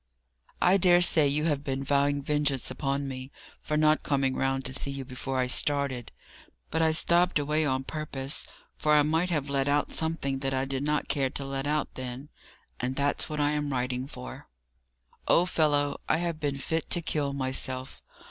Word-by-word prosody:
"I 185 Hz, +2 st, +5 dB
dare 175 Hz, -2 st, +5 dB
say 160 Hz, -4 st, +5 dB
you 150 Hz, +2 st, +1 dB
have 145 Hz, -3 st, 0 dB
been 135 Hz, -1 st, -2 dB
vowing 140 Hz, 0 st, +1 dB
vengeance 145 Hz, -3 st, 0 dB
upon 140 Hz, +1 st, -2 dB
me, 130 Hz, 0 st, -7 dB, 0.3 s
for 150 Hz, -, -1 dB
not 155 Hz, 0 st, +4 dB
coming 135 Hz, -2 st, 0 dB
round 135 Hz, 0 st, 0 dB
to 130 Hz, -, -1 dB
see 135 Hz, -, -3 dB
you 135 Hz, -1 st, -5 dB
before 130 Hz, +1 st, -4 dB
I 130 Hz, -, +2 dB
started; 135 Hz, -1 st, 0 dB, 0.6 s
but 160 Hz, -, +1 dB
I 160 Hz, -, +4 dB
stopped 175 Hz, +2 st, +3 dB
away 150 Hz, +1 st, +1 dB
on 130 Hz, -1 st, 0 dB
purpose, 145 Hz, -2 st, -3 dB, 0.3 s
for 150 Hz, 0 st, +2 dB
I 150 Hz, -, +6 dB
might 160 Hz, +4 st, +1 dB
have 150 Hz, -5 st, -1 dB
let 140 Hz, -1 st, 0 dB
out 145 Hz, +1 st, +1 dB
something 160 Hz, -4 st, -1 dB
that 135 Hz, 0 st, -1 dB
I 130 Hz, +1 st, 0 dB
did 135 Hz, 0 st, -3 dB
not 150 Hz, +1 st, 0 dB
care 135 Hz, -2 st, 0 dB
to 140 Hz, -, -5 dB
let 135 Hz, 0 st, -3 dB
out 150 Hz, 0 st, -1 dB
then; 130 Hz, +2 st, -7 dB, 0.5 s
and 125 Hz, +1 st, -2 dB
that's 145 Hz, +3 st, +1 dB
what 150 Hz, -1 st, -3 dB
I 145 Hz, 0 st, +2 dB
am 150 Hz, -1 st, -1 dB
writing 125 Hz, 0 st, -2 dB
for." 125 Hz, -2 st, -9 dB, 0.8 s
"Old 180 Hz, +1 st, +4 dB
fellow, 145 Hz, -2 st, +1 dB
I -, -, +4 dB
have 170 Hz, -2 st, -2 dB
been 145 Hz, -2 st, -1 dB
fit 160 Hz, +4 st, -2 dB
to 175 Hz, -, 0 dB
kill 145 Hz, -3 st, -1 dB
myself. 130 Hz, -1 st, -1 dB
140 Hz, 190 wpm, -28 LUFS, 135-150 Hz, 0.8 s, I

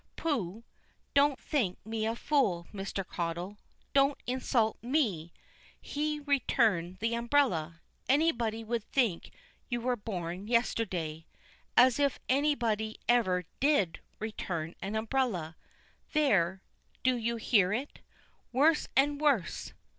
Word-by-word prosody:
Pooh! 230 Hz, -, -2 dB, 0.5 s
don't 280 Hz, -1 st, +4 dB
think 225 Hz, -12 st, -1 dB
me 220 Hz, 0 st, -2 dB
a 225 Hz, -, -1 dB
fool, 235 Hz, -, +1 dB
Mr. 195 Hz, -1 st, -4 dB
Caudle. 175 Hz, +4 st, -4 dB, 0.4 s
Don't 275 Hz, 0 st, +4 dB
insult 245 Hz, -3 st, 0 dB
me. 230 Hz, -, 0 dB, 0.5 s
He 300 Hz, +1 st, -2 dB
return 225 Hz, -, +1 dB
the 225 Hz, +3 st, 0 dB
umbrella! 235 Hz, -, +1 dB, 0.3 s
Anybody 240 Hz, -7 st, +2 dB
would 230 Hz, 0 st, -2 dB
think 230 Hz, -11 st, 0 dB, 0.4 s
you 240 Hz, -1 st, -1 dB
were 250 Hz, +1 st, 0 dB
born 190 Hz, -3 st, -5 dB
yesterday. 185 Hz, -9 st, -1 dB, 0.5 s
As 250 Hz, +1 st, +6 dB
if 280 Hz, -2 st, +1 dB
anybody 235 Hz, -6 st, +1 dB
ever 185 Hz, -7 st, +3 dB
did 275 Hz, -, +2 dB, 0.2 s
return 175 Hz, -7 st, -4 dB
an 195 Hz, +3 st, -4 dB
umbrella! 220 Hz, -8 st, -1 dB, 0.6 s
There 195 Hz, -, +2 dB, 0.4 s
do 255 Hz, 0 st, +3 dB
you 235 Hz, 0 st, -1 dB
hear 210 Hz, -4 st, +3 dB
it? 255 Hz, +7 st, -3 dB, 0.5 s
Worse 300 Hz, +5 st, +3 dB
and 285 Hz, +2 st, +3 dB
worse? 265 Hz, -, +1 dB
230 Hz, 115 wpm, -31 LUFS, 185-270 Hz, 0.6 s, As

